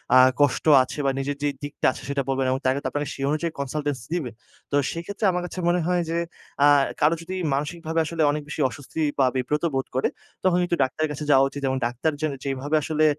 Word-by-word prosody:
আ - - +9 0.2
কষ্ট 145 -3 +2 0.2
আছে 130 - -7
বা 135 - +3
নিজের 140 +1 -2
যেই 145 -1 +1
দিকটা 145 - -4
আছে - - -10
সেটা 140 -1 0
বলবেন। 135 0 +1
এবং 130 - 0
তার 130 - +4
তে - - -1
আপনারা 145 0 -2
সেই 135 - -5
অনুযায়ী 155 +3 -1
কনসালটেন্স 145 0 -2
দিবে। 155 -9 -2 0.4
তো - - +1 0.2
সেইক্ষেত্রে 200 +6 -4
আমার 180 0 -1
কাছে 180 - -6
মনে 175 +1 +2
হয় 180 -1 +2
যে 165 - 0 0.5
আ - - +8 0.3
কারো 155 +3 +4
যদি 185 +3 -5 0.2
মানসিকভাবে 160 +3 -2
আসলে 165 +1 -2
অনেক 150 +1 -2
বেশি 155 - -3
অস্বস্তি 145 +5 -6 0.2
বা 135 - +5
বিব্রত 145 +5 -1
বোধ 135 - -1
করে। 130 - +2 0.4
তখন 185 -1 +3
কিন্তু 175 -1 0
ডাক্তারের 150 +4 -1
কাছে 150 +1 -5
যাওয়া 135 -1 +6
উচিত। 145 - -7
এবং 130 0 0
ডাক্তার 125 +6 0
যে 155 - +2 0.2
যেভাবে 140 +2 -1
আসলে 155 0 +1
145 Hz, 220 wpm, -24 LUFS, 135-165 Hz, 0.5 s, আ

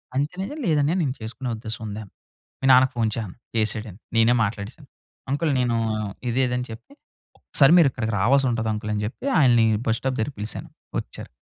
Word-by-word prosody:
అంతే 170 +8 -1 0.2
"లేదన్నయ్య 155 0 +2
నేను 130 -3 -1
చేసుకునే 120 +3 -5
ఉద్దేశం 110 +1 -6
ఉంది" 105 +1 -5
అను. 100 - -16 0.5
మీ 135 - -2
నాన్నకు 130 +1 +6
ఫోన్ 115 -2 +1
చేయి 115 - -2
అను. 90 - -10 0.2
చేసాడు 110 0 0
అని 95 - -16 0.2
నేనే 115 +1 +5
మాట్లాడేసాను. 105 +7 -5 0.4
అంకుల్ 145 +2 +1
నేను 120 -2 +1 0.5
ఇదే 125 +3 +1
ఇది 125 - -1
అని 125 - -3
చెప్పి. 115 - -11 0.4
ఒకసారి 140 +1 +3
మీరు 165 -5 +7
ఇక్కడికి 110 -3 -3
రావాలసుంటది 120 0 +2
అంకల్ 105 0 -4
అని 105 - -1
జెప్పి 115 - -7
ఆయనని 120 -6 +5 0.2
బస్ 115 0 +1
స్టాప్ 130 -1 -1
దగ్గరికి 125 +5 -2
పిలిసాను. 105 +2 -6 0.3
ఒచ్చారు. - - -9
120 Hz, 185 wpm, -24 LUFS, 110-135 Hz, 0.5 s, మీరు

